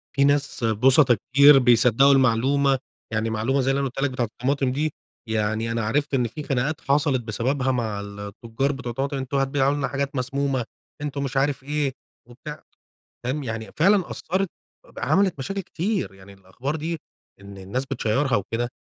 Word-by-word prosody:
في 140 - +3
ناس 140 -2 +1
بُسطَا 125 +4 +5
كتير 140 +6 +6
بيصدقوا 125 +2 +5
المعلومة، 135 +1 +3 0.3
يعني 110 +1 0
معلومة 115 +5 0
زي 130 +1 +1
اللي 135 - 0
أنا 135 - 0
قولتها 130 - -6
لك - - -6
بتاعة 125 -2 -1
الطماطم 130 +4 -1
دي، 150 +3 -1 0.3
يعني 110 +1 -1
أنا 115 -1 -1
عرفت 145 +6 0
إن 125 -3 +2
في 150 +6 -7
خناقات 135 +3 -1
حصلت 140 -2 +2
بسببها 125 +4 -1
مع 110 -5 -2
التجار 105 +6 -4
بتوع 135 -3 -6
الطماطم. 135 +4 -2
"أنتم 135 +1 -2
هتبيعوا 135 0 +2
لنا 145 -2 -1
حاجات 140 0 -3
مسمومة، 135 -1 -1 0.4
أنتم 145 -1 -3
مش 135 0 -3
عارف 135 0 +1
إيه." 145 0 -1 0.4
وبتاع، 150 +5 -9 0.6
فاهم، 135 +4 -2
يعني 110 -3 -5
فعلًا 190 +3 +3
أثرت 190 +1 -2 0.4
إب - - -12
عملت 195 -6 +2
مشاكل 195 +9 -3
كتير، 190 - -2
يعني 95 +1 -15
الأخبار 100 +10 -5
دي 165 +2 -3 0.4
إن 100 0 -11
الناس 100 +8 -3
بتشيرها 135 +1 0
وكده 115 +4 -2
135 Hz, 170 wpm, -24 LUFS, 115-140 Hz, 0.6 s, كتير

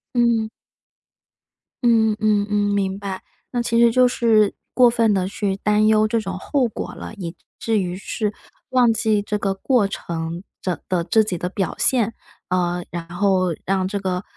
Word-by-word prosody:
嗯。 235 -2 +2 1.3
嗯 225 -2 +4
嗯 210 -1 +2
嗯， 205 0 +1
明 195 -1 0
白。 195 -2 -5 0.3
那 245 -2 0
其 235 -1 +1
实 235 0 +6
就 255 +2 +5
是 225 -4 +3 0.2
过 250 -1 +6
分 230 -2 +2
地 185 -2 0
去 195 -1 -2
担 210 +1 +2
忧 215 0 +4
这 230 +1 0
种 195 -3 -5
后 265 +5 0
果 220 - -6
了， - - -8
以 180 -4 -6 0.2
至 225 -2 +1
于 180 -2 -2
是 210 +2 -3 0.4
忘 250 -2 +4
记 220 -2 +1
这 210 +1 -2
个 195 -1 -1
过 210 +1 +1
程 170 -1 -5 0.2
着 180 -5 -2
的 180 -2 +1
自 220 +5 +3
己 190 -5 -3
的 180 - -3
表 190 -2 -2
现， 230 -3 +2 0.4
呃， 180 -1 0
然 170 -1 -5
后 185 -1 +1
让 190 -1 0
这 200 +1 -3
个， 185 -1 -2
205 Hz, 190 characters per minute, -21 LUFS, 185-225 Hz, 1.3 s, 实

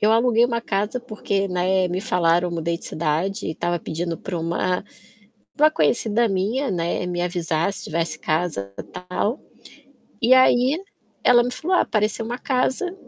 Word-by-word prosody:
Eu 210 - +4
aluguei 230 0 +4
uma 235 -1 0
casa, 210 +2 -1
porque, 205 -4 -2
né, 185 +1 +1
me 180 +1 -2
falaram. 175 -3 +2
Mudei 170 0 -2
de - - -11
cidade 170 +7 -1
e 160 - -3
tava 175 +2 -1
pedindo 165 +1 -4
pra 180 0 -5
uma 170 +3 -1 0.7
pra 300 +1 +6
uma - - +5
conhecida 235 -5 +2
minha, 215 +8 0
né, 175 0 -1
me 175 -1 -2
avisar 175 0 0
se - - -9
tivesse 165 +1 -2
casa, 155 - -2 0.4
tal. 210 +8 -1 0.8
E 245 +2 +6
aí, 260 +5 +4 0.4
ela 240 -1 +6
me 245 - -2
falou: 320 +9 0
"Ah, - - +4
apareceu 215 0 0
uma 240 +2 -4
casa". 265 +8 -1
195 Hz, 165 wpm, -23 LUFS, 170-240 Hz, 0.8 s, pra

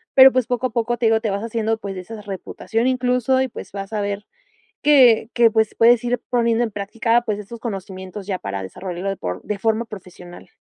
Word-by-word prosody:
pero 265 0 +9
pues 255 -2 0
poco 245 0 -1
a - - -12
poco 235 +1 -1
te 235 - -1
digo 225 0 +3
te 220 - -1
vas 200 +1 -2
haciendo 225 -1 -1
pues 200 -3 -6
de 185 - -5
esa 215 +4 -9
reputación 205 +4 -3
incluso 250 0 +1
y 265 - +1
pues - - -9
vas 195 +1 -7
a 210 - -1
ver 200 0 -3 0.6
que 250 -7 +6
que 235 -1 +5
pues, 220 -1 +1
puedes 235 0 +5
ir 245 0 0
poniendo 235 -1 +2
en 235 - -1
práctica 230 +4 0
pues 210 -1 -2
esos 225 +3 -9
conocimientos 190 -3 -7
ya 190 -3 -1
para 100 - -4
desarrollarlo 180 - -5
de 195 - -3
por 90 0 -4
de 210 - -3
forma 225 +2 0
profesional. 180 -4 -12
220 Hz, 220 wpm, -21 LUFS, 195-235 Hz, 0.6 s, pero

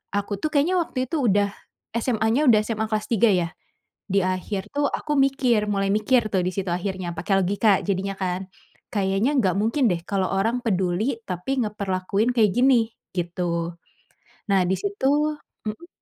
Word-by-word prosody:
aku 205 0 -1
tuh 310 - 0
kayaknya 310 +6 +3
waktu 255 -5 -3
itu 325 - -1
udah 200 -1 +3 0.5
SMA 225 -2 0
nya 290 - +3
udah 215 - +5
SMA 220 -1 -1
kelas 215 -1 -1
3 230 -1 +4
ya. 170 -2 +1 0.6
Di 195 +1 +3
akhir 190 +2 -2
tuh 290 0 +1
aku 300 - -2
mikir, 260 -5 +3
mulai 195 -1 0
mikir 220 +2 +2
tuh 185 -2 +2
disitu 185 0 -2
akhirnya 180 -2 -3
pake 190 +4 -3
logika 200 +2 +3
jadinya 195 0 -1
kan. 185 0 -3 0.4
Kayaknya 195 +4 +1
enggak 190 -6 +2
mungkin 240 +4 +2
deh 170 -1 0
kalo 195 -2 +1
orang 225 +6 +1
peduli 205 +4 0
tapi 215 +9 -2
ngeperlakuin 200 +1 -1
kayak 215 -4 +4
gini, 245 -3 +4 0.3
gitu. 170 -1 -2 0.7
Nah, 190 -2 +4
disitu 300 - 0 0.3
mmm. 335 +12 -7
205 Hz, 155 wpm, -24 LUFS, 185-245 Hz, 0.7 s, udah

